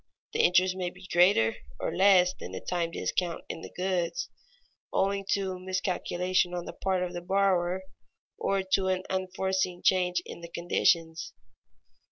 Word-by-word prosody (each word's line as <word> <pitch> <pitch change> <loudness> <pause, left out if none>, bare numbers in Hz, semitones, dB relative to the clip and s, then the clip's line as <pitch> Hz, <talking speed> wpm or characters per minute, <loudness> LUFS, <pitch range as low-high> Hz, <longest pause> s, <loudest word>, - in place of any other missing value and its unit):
The - - -2
interest 185 +1 +4
may 180 -1 -2
be 180 +1 -14
greater 175 - +4 0.2
or - - -2
less 185 -2 +5
than 95 - -9
the 95 - -4
time 175 -2 -2
discount 170 0 -2
in 165 - -5
the - - -8
goods, 185 - -2 0.6
owing 195 0 +1
to 190 -2 -2
miscalculation 185 -1 0
on 175 -1 -4
the - - -7
part 190 -1 0
of 180 0 -4
the 175 - -4
borrower 190 -1 +1 0.6
or 195 -1 0
to 190 0 +1
an 185 0 0
unforeseen 190 -1 -1
change 180 -1 +3
in - - -9
the 170 - -8
conditions. 165 -1 +1
185 Hz, 155 wpm, -29 LUFS, 175-190 Hz, 0.6 s, less